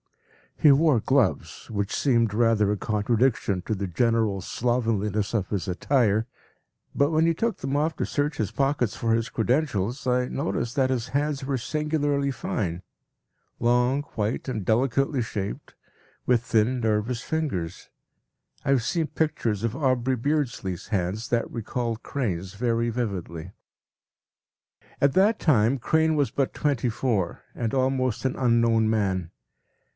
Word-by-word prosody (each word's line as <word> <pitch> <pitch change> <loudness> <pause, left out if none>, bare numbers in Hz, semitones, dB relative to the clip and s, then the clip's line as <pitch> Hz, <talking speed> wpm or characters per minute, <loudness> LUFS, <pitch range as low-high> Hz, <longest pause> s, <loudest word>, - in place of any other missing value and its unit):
He 150 - +6
wore 145 -3 +4
gloves, 110 - 0
which 100 -1 -2
seemed 115 -6 +2
rather 110 -3 +3
a 105 - 0
contradiction 105 -2 +1
to - - -2
the 100 -1 -3
general 110 +1 +1
slovenliness 110 -2 -1
of 100 -5 -1
his 100 -2 -2
attire, 110 +3 +1 0.7
but 140 +1 +2
when 160 +1 +3
he 165 - +3
took 230 +7 -1
them 135 +1 -3
off 155 +2 +1
to - - -2
search 145 +1 -1
his 105 -3 -1
pockets 135 -3 0
for 115 -1 0
his 115 0 0
credentials, 120 -1 0
I 125 0 +1
noticed 130 -4 -2
that 135 -2 +2
his 125 -2 -1
hands 145 -1 -1
were 135 -1 -1
singularly 145 +1 0
fine; 95 -8 -3 0.8
long, 125 +4 +2
white, 110 +5 -2
and 110 -7 -3
delicately 130 +4 +1
shaped, 105 -3 -5 0.5
with 120 -2 +2
thin, 115 +3 +1
nervous 110 +1 0
fingers. 125 - -3 0.8
I - - -1
have 135 -4 +3
seen 165 +4 0
pictures 115 -11 -1
of 115 +1 -1
Aubrey 130 -3 +1
Beardsley’s 120 - -2
hands 100 +2 -2
that 120 -1 0
recalled 115 0 -3
Crane’s 95 -9 -3
very 115 +1 0
vividly. 95 -7 -4 1.5
At 140 -1 +3
that 205 +6 +3
time 125 -4 +3
Crane 160 +5 +2
was 145 -2 +2
but 135 -2 -1
twenty 140 -5 0
four, 110 -6 -1
and 115 -2 -2
almost 130 -2 0
an 130 - 0
unknown 115 -3 +3
man. 95 -6 0
120 Hz, 140 wpm, -25 LUFS, 105-135 Hz, 1.5 s, He